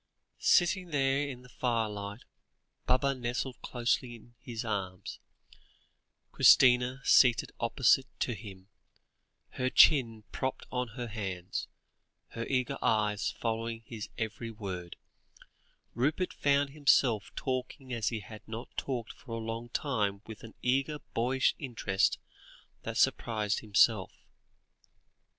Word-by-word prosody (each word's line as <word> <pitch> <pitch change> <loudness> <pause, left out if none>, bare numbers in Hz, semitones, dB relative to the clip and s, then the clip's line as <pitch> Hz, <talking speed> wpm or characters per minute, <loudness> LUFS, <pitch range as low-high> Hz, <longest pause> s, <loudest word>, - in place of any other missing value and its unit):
Sitting 180 +1 +3
there 140 -1 +1
in 125 -2 -8
the - - -14
firelight, 110 -3 -2 0.6
Baba 135 +2 +3
nestled 125 0 -4
closely 120 0 -1
in 120 +1 -17
his 120 -1 -6
arms, 95 -3 -4 1.1
Christina 125 +1 +5
seated 125 -3 +5
opposite 130 +3 +3
to 120 - 0
him, 95 -3 -10 0.8
her 130 0 -1
chin 115 -7 +5
propped 130 0 -3
on 125 -3 -3
her 120 - -3
hands, 95 -5 -4 0.6
her 115 0 -5
eager 125 -2 -1
eyes 105 -2 +1
following 115 0 -3
his 110 -2 -7
every 110 0 -4
word 95 -6 -6 1.0
Rupert 150 +9 0
found 140 -1 +2
himself 135 -7 +3
talking 130 0 -4
as 115 -2 0
he 115 -3 -4
had 105 +2 -11
not 115 +3 -8
talked 120 -4 -3
for 120 - -11
a - - -2
long 115 +1 -5
time 105 -7 -1
with 110 -1 -10
an 115 - -12
eager 135 +4 +1 0.2
boyish 130 +3 +2
interest 115 -8 0 0.6
that - - -5
surprised 110 -2 +1
himself. 105 -1 +3
120 Hz, 120 wpm, -31 LUFS, 110-130 Hz, 1.1 s, Christina